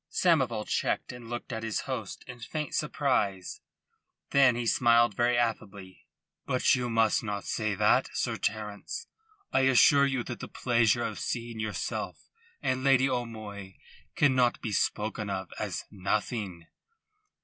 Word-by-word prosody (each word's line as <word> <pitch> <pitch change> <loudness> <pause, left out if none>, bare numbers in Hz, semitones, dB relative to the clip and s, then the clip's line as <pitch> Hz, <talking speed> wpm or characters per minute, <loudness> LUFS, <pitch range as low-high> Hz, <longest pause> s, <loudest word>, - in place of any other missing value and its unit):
Samoval 130 -11 +2
checked - - -1
and 120 -2 -10
looked 120 +1 -5
at 110 - -3
his 110 -1 -2
host 120 -7 -5
in 125 -1 -9
faint 150 +6 -5
surprise. 110 -11 -1 0.7
Then 135 -3 +5
he 120 0 -2
smiled 120 -1 +4
very 120 +2 +2
affably. 100 -5 -3 0.4
"But 125 - +3
you 125 -2 0
must 115 -2 +3
not 105 -2 -4
say 110 -2 -1
that, - - +3
Sir - - -1
Terence. 105 - -4 0.5
I - - +4
assure 135 +2 +5
you 130 -3 -1
that 120 - -6
the - - -6
pleasure 120 -2 +2
of - - -4
seeing 115 -2 -4
yourself 110 -1 -4 0.3
and 130 0 0
Lady 135 -1 +4
O'Moy 110 -6 -5 0.4
cannot 130 -4 +3
be 110 - -4
spoken 105 +1 -1
of 95 -1 -4
as - - -3
nothing." 100 -2 -2
115 Hz, 140 wpm, -29 LUFS, 105-125 Hz, 0.7 s, Then